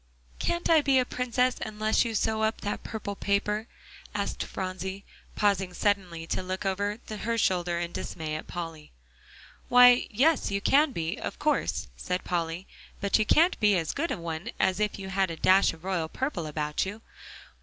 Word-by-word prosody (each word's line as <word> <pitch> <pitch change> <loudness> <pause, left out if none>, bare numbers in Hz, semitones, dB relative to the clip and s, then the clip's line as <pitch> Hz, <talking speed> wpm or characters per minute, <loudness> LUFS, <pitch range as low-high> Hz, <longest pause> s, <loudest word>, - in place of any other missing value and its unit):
"Can't 345 0 -1
I 320 -2 +6
be 275 -2 +3
a 255 - +3
Princess 250 0 0
unless 215 0 +1
you 230 -2 -3
sew 220 +1 +1
up 220 +1 0
that 205 - -3
purple 205 -2 -5
paper?" 210 +2 0 0.5
asked - - -2
Phronsie, 190 +1 -5 0.3
pausing 195 -3 +1
suddenly 185 -5 0
to 165 - -2
look 185 +1 -4
over 200 +2 -1
her 225 +2 -2
shoulder 175 -4 +1
in 170 0 -3
dismay 160 -3 -5
at 155 - -6
Polly. 165 -3 -7 0.8
"Why, 245 0 +7
yes, 275 +7 +2
you 200 0 0
can 285 +8 +4
be, 165 -7 -3
of - - -5
course," - - 0
said 180 - -3
Polly, 170 +1 -2 0.3
"but 200 +2 +2
you 215 - +1
can't 340 +4 +4
be 210 -3 +4
as 165 -2 -2
good 330 +4 -1
a - - -2
one 165 -1 -5
as 190 +1 +2
if 210 -1 0
you 190 -1 -7
had 190 -1 +1
a 165 - -4
dash 190 +4 +4
of 165 0 -14
royal 180 -4 -1
purple 225 - -3
about 150 0 -1
you. 205 +4 -6
200 Hz, 180 wpm, -28 LUFS, 175-220 Hz, 0.8 s, Why